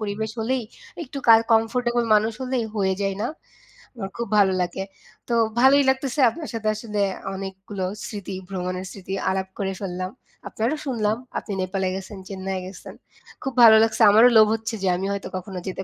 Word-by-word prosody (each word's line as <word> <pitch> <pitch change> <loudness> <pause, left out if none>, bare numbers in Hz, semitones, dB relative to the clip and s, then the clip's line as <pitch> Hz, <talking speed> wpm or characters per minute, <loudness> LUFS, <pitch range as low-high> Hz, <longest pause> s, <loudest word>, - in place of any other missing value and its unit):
পরিবেশ 215 +1 -3
হলেই, 250 +3 0 0.4
একটু 280 -1 -7
কাই 225 0 +9
comfortable 240 +1 +2
মানুষ 215 +2 +2
হলেই 255 -2 -1
হয়ে 190 -2 +1
যায় 195 -1 -1
না? - - 0 0.7
আমার 195 -4 -5
খুব 235 - -3
ভালো 195 -2 +5
লাগে। 180 +2 -2 0.4
তো 240 - -2 0.3
ভালোই 275 +2 +6
লাগতেছে 265 0 -1
আপনার 300 +7 -7
সাথে 220 -1 -3
আসলে 210 -1 -3 0.3
অনেকগুলো 195 0 -5 0.2
স্মৃতি, 200 -3 -6
ভ্রমণের 185 -1 -4
স্মৃতি 190 -1 -7 0.2
আলাপ 190 0 -1
করে 195 -1 -1
ফেললাম। 185 -1 -4 0.4
আপনারও 235 +8 -1
শুনলাম 220 -5 0 0.2
আপনি - - -5
নেপালে 190 +1 -1
গেছেন, 195 +1 -7
চেন্নাইয়ে 190 -1 -4
গেছেন। 185 +1 -10 0.5
খুব 270 - -3
ভালো 220 -1 +10
লাগছে। 225 0 0
আমারও 225 +4 +7
লোভ 215 -1 +8
হচ্ছে 225 +1 -5
যে - - +1
আমি 190 - -3
হয়তো 200 -1 -4
কখনো 185 0 -6
যেতে 190 0 -4
210 Hz, 170 wpm, -23 LUFS, 190-230 Hz, 0.7 s, ভালো